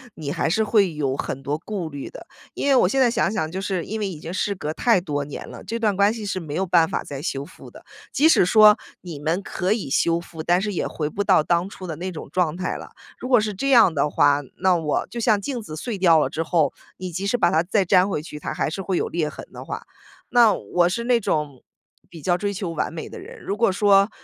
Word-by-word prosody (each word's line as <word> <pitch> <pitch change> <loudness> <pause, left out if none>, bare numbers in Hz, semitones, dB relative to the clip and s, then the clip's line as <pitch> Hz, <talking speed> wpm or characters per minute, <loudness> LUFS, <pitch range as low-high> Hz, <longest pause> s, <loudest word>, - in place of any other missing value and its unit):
你 145 -3 -5
还 - - 0
是 220 +6 +2
会 205 -5 +3
有 140 -3 -1
很 135 0 -4
多 145 +2 -2
顾 180 0 -5
虑 140 -2 -7
的。 - - -12 0.3
因 - - -2
为 275 - +5
我 255 - +5
现 270 - 0
在 250 -2 +5
想 220 - +1
想， 160 -7 -2
就 190 +3 -4
是 190 -4 -2
因 220 +1 -4
为 200 - -1
已 160 -5 -8
经 165 +3 -7
事 200 +2 -1
隔 155 -4 -4
太 230 -1 +3
多 145 -5 -3
年 140 - -8
了， - - -10
这 230 0 -4
段 210 -3 +1
关 200 +2 +3
系 225 -2 -6
是 195 -2 -2
没 150 -2 -6
有 190 - 0
办 170 -2 +3
法 - - -2
再 140 -1 -6
修 140 -3 -3
复 180 - -14
的， - - -15 0.3
即 305 - +4
使 320 - +5
说 210 +2 +7 0.2
你 170 -5 -8
们 165 +6 -1
可 185 +2 -2
以 215 - -1
修 170 +5 +2
复， 165 -2 -9
但 175 +2 +2
是 210 -1 -2
也 - - -1
回 150 -1 -3
不 205 +6 -2
到 190 -5 +4
当 175 +3 0
初 185 -2 -9
的 160 - -4
那 185 +3 -5
种 160 - -8
状 175 -1 0
态 185 - -2
了。 - - -8 0.3
如 255 - -6
果 245 - +6
是 215 -1 -2
这 275 +8 -2
样 230 -10 +6
的 145 0 +1
话， 145 0 +3 0.2
那 185 -1 +3
我 160 -3 -1
就 235 - -7
像 215 -2 +3
镜 245 +3 -4
子 155 -6 -8
碎 225 +3 -4
掉 170 -4 +5
了 - - +1
之 165 - -3
后， 160 -2 +1 0.2
你 185 -1 -6
即 190 +4 -3
使 245 +5 +1
把 - - +3
它 160 - +2
再 190 +2 +1
粘 185 +2 +4
回 150 - -2
去， 150 -1 -9
它 - - -4
还 - - -1
是 195 +4 -5
会 185 -2 -1
有 - - 0
裂 160 -3 -1
痕 - - -10
的 - - -8
话。 - - -6 0.5
那 240 -3 +5
我 175 0 +1
是 235 +6 -2
那 240 -1 +3
种 150 - -2 0.5
比 165 -3 -11
较 175 +2 +1
追 205 +2 -2
求 185 -3 -4
完 160 - -2
美 160 - -6
的 - - -9
人， - - -11
如 200 - -3
果 225 -3 +2
说 200 +1 +4
185 Hz, 290 characters per minute, -23 LUFS, 160-205 Hz, 0.5 s, 说